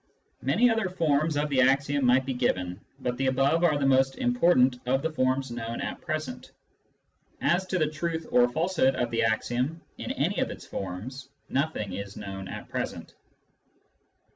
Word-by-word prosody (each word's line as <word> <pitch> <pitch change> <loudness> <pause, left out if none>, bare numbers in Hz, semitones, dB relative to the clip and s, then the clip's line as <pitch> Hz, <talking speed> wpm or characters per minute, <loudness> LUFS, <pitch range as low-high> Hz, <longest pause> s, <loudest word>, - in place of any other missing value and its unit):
Many 205 - +3
other 225 -4 0
forms 155 -4 +1
of 150 +1 +1
the 135 -2 +3
axiom 140 +2 +2
might 125 +1 +4
be 135 - -2
given, 90 -7 -1 0.2
but 125 -1 -2
the 135 +1 0
above 135 +6 +2
are 155 -4 +4
the 140 - 0
most 135 0 +3
important 175 - +3
of 135 +2 +1
the 160 - 0
forms 130 -2 0
known 115 -1 -4
at - - -4
present. 155 -5 -4 0.9
As 185 +2 +1
to 185 - 0
the 155 - +3
truth 160 +1 -3
or 125 0 +5
falsehood 160 -2 +1
of 125 -1 -1
the 115 - +1
axiom 120 +7 0 0.2
in - - -5
any - - 0
of - - 0
its - - -8
forms, 115 +9 -6 0.2
nothing 135 -9 -1
is 100 +1 -6
known 95 -2 -6
at - - -7
present. - - -5
135 Hz, 170 wpm, -27 LUFS, 125-155 Hz, 0.9 s, or